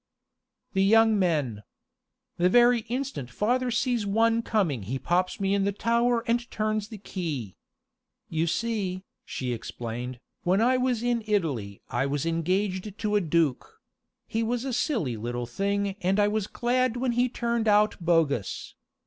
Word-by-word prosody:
"The 190 -1 +3
young 220 +1 +5
men. 145 - 0 0.8
The 180 +1 +3
very 240 +3 +5
instant 250 - -3
father 245 - 0
sees 240 -1 0
one 225 +3 +2
coming 190 - 0
he 115 +8 -3
pops 180 +6 0
me 195 0 +1
in 200 -1 +2
the 200 - +1
tower 235 +3 +1
and 240 +1 0
turns 215 -1 -1
the 215 - -9
key. 155 - -5 0.7
You 160 +1 -1
see," 190 -2 -1 0.2
she 125 -2 -3
explained, 120 +2 -6 0.2
"when 185 +3 +2
I 245 +3 +4
was 250 -2 0
in 240 -2 0
Italy 140 - -1
I 135 +4 0
was 140 +1 -1
engaged 185 +4 -1
to 210 -1 -1
a 205 - +4
duke 160 -5 0 0.5
he 225 - -2
was 240 +2 -1
a 265 - -2
silly 225 - 0
little 120 +2 -3
thing 200 +10 -1
and 190 +3 +2
I 205 - +4
was 210 -1 -1
glad 250 +1 0
when 250 0 0
he 245 +1 +2
turned 235 -2 -1
out 210 0 +4
bogus. 160 - 0
200 Hz, 155 wpm, -27 LUFS, 160-230 Hz, 0.8 s, young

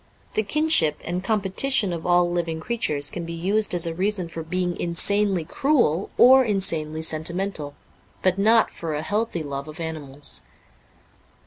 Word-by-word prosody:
The - - +1
kinship 220 - +2
and 180 +2 -3
competition 205 +1 +2
of 165 0 -5
all 175 0 +4
living 170 -2 -2
creatures 160 -8 -1
can 175 - -5
be 170 0 -6
used 195 +4 +1
as 170 - +2
a 165 - -2
reason 185 0 -1
for 165 0 -6
being 175 +2 -2
insanely 190 +1 0
cruel 235 - +1
or 260 +2 +7
insanely 165 -8 -2
sentimental; 160 -1 -3 0.5
but 185 +1 +2
not 225 +3 +4
for 160 -2 -5
a 150 - -3
healthy 205 -2 -2
love 140 0 -5
of 155 +1 -10
animals. 150 -4 -4
175 Hz, 150 wpm, -23 LUFS, 160-205 Hz, 0.5 s, or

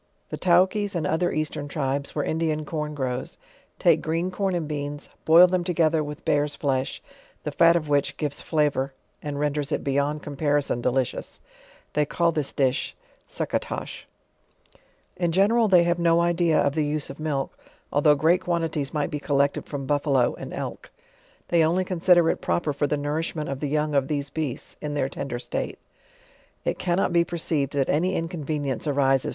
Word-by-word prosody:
The - - -4
Taukies 190 +3 +2
and 165 -3 -1
other 170 +4 +1
Eastern 155 -1 -2
tribes, 140 0 -2
where 145 - 0
Indian 155 -1 -1
corn 150 -1 -4
grows, 130 -2 -3 0.4
take 165 -3 +4
green 165 +3 -1
corn 190 0 -1
and 165 -3 -2
beans, 145 -1 -5 0.2
boil 165 +3 +8
them 180 0 0
together 165 -3 +2
with 150 0 -8
bear's 145 0 +1
flesh, 135 -2 -1 0.4
the - - -3
fat 170 0 +5
of 160 -3 0
which 145 -1 +1
gives 145 -2 -2
flavor 145 -4 0 0.3
and 145 -1 -4
renders 145 0 -1
it - - -1
beyond 140 +2 0
comparison 145 -3 0
delicious; 125 +1 -1 0.5
they 150 - +2
call 170 +3 +1
this 150 -3 -1
dish 135 0 0 0.3
fe'ucca - - -1
tosli. - - -6 1.1
In 175 -2 0
gensral 215 +6 +4
they 180 -2 +6
have 170 0 +1
no 170 0 +4
idea 170 -2 +2
of 140 - +2
the 155 0 +1
use 150 -1 -2
of 135 - -12
milk, 145 -3 -2 0.4
although 150 +1 +5
great 165 +5 +3
quantities 165 -5 -2
might 150 +2 -1
be 150 - -2
collected 140 -1 0
from 140 -2 -5
buffalo 140 -3 +2
and - - -8
elk. - - -6 0.6
They 170 -2 +4
only 175 +4 +2
consider 175 -1 +4
it - - -5
proper 155 -4 0
for 145 +1 0
the 150 - 0
nourishment 150 +1 -2
of 135 -1 -3
tho 145 - -2
young 150 +1 0
of 140 -2 +2
these 145 -2 -2
beasts, 150 -5 -4
in 150 -1 -3
their 135 -2 0
tender 135 -3 -4
state. 120 - -4 0.9
It - - -1
cannot 175 0 +1
be 170 0 +5
perceived 160 -5 -2
that 140 -2 +1
any 180 +6 +1
inconvenience 155 -4 -3
arises 135 -2 +2
150 Hz, 175 wpm, -25 LUFS, 140-170 Hz, 1.1 s, boil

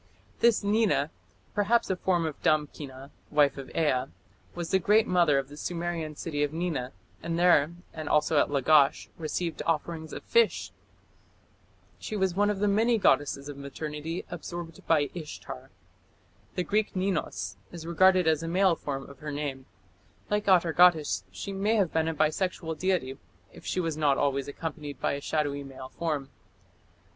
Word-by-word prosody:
This 235 -3 +4
Nina, 200 -9 +2 0.4
perhaps 215 +1 +2
a - - +1
form 175 -2 +1
of 155 -2 -5
Damkina, 145 -3 -1 0.2
wife 145 -2 +3
of 135 -2 -8
Ea, 130 -5 +2 0.5
was 175 -1 -4
the 190 - +4
great 210 +4 +4
mother 170 -6 +3
of 135 -1 -1
the 145 - -11
Sumerian 170 -1 -3
city 145 -1 -3
of 145 -1 +1
Nina, 160 -6 -2 0.3
and 165 0 -2
there, 170 -2 +4 0.2
and 155 -2 -5
also 150 0 +3
at - - +2
Lagash, 140 0 +3
received 165 +1 -3
offerings 160 0 -2
of - - -7
fish. 470 0 +2 1.3
She 215 - -5
was 190 -3 +1
one 205 +3 +2
of 210 - 0
the 205 +1 +1
many 225 +4 +3
goddesses 145 -7 +2
of 145 -1 -7
maternity 150 +3 -5
absorbed 170 -1 -7
by 145 -4 +3
Ishtar. 150 -5 -8 0.9
The 180 - 0
Greek 210 +2 0
Ninus 130 - -2
is 170 -2 -8
regarded 185 +2 +4
as 160 -1 +3
a 165 - -4
male 185 +1 +3
form 135 -3 -5
of 140 -2 -13
her 150 -1 -5
name; 140 -3 -4 0.6
like 210 0 0
Atargatis, 175 -3 +4
she 200 - -6
may 205 +3 +1
have 195 -6 +1
become 160 0 +1
a 165 - -1
bisexual 160 +1 -1
deity, 175 -9 0 0.3
if - - -12
she - - -1
was 165 -3 -1
not 145 -3 +3
always 140 -1 0
accompanied 150 -1 -6
by - - 0
a 140 - -3
shadowy 145 -1 -1
male 130 -1 -9
form. 150 -5 -3
160 Hz, 165 wpm, -28 LUFS, 145-180 Hz, 1.3 s, This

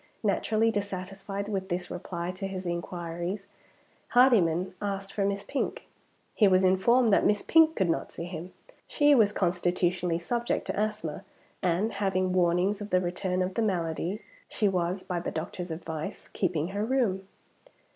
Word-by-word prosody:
Naturally 225 +1 +2
dissatisfied 195 0 -4
with 195 -2 -3
this 180 0 -3
reply 175 -1 -4
to 190 +2 -5
his 190 -1 -5
inquiries, 175 +2 -4 0.6
Hardyman 190 -8 +4
asked 195 -1 -3
for 205 - 0
Miss 200 0 -1
Pink. 285 - -3 0.5
He 210 - +5
was 185 0 +4
informed 220 +5 +4
that - - +4
Miss 205 -1 +2
Pink 320 0 +5
could 190 - +1
not 165 - -1
see - - -6
him. 175 +1 -7 0.4
She 290 -1 +4
was 220 -6 +5
constitutionally 180 -2 0
subject 235 +7 -1
to - - -3
asthma, 210 -5 -2 0.4
and, 185 +5 +1
having 190 -2 0
warnings 180 +3 +2
of 205 - -5
the 185 - +3
return 180 +1 -1
of 185 +1 -3
the 230 - 0
malady, 180 0 -1 0.3
she 210 - +1
was 185 0 -1
(by 180 -2 -2
the 170 - -3
doctor's 175 +3 -5
advice) 160 -1 -6
keeping 170 -3 -1
her 200 +2 -2
room. 220 -6 0
190 Hz, 155 wpm, -28 LUFS, 175-205 Hz, 0.6 s, He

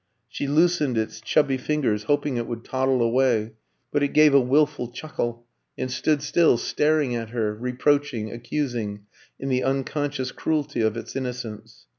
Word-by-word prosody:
She 140 - -4
loosened 150 -4 +2
its 110 0 -2
chubby 135 +4 +2
fingers, 125 -8 0
hoping 145 +1 +1
it 120 - -2
would 115 -1 -5
toddle 130 -1 +1
away; 115 -2 +2 0.4
but 145 - +1
it 145 - 0
gave 150 -1 +6
a 140 - +8
wilful 145 0 +2
chuckle, 120 -3 -4 0.3
and 130 0 -3
stood 140 +3 +1
still, 155 -2 +4
staring 150 +1 +1
at 115 -2 -3
her, 110 -3 -1
reproaching, 125 0 0
accusing, 120 -4 -3 0.4
in 135 - -3
the 130 -1 +1
unconscious 135 0 -1
cruelty 150 -6 -1
of 110 +1 +1
its 115 - -7
innocence. 125 - -6
130 Hz, 155 wpm, -24 LUFS, 115-145 Hz, 0.4 s, a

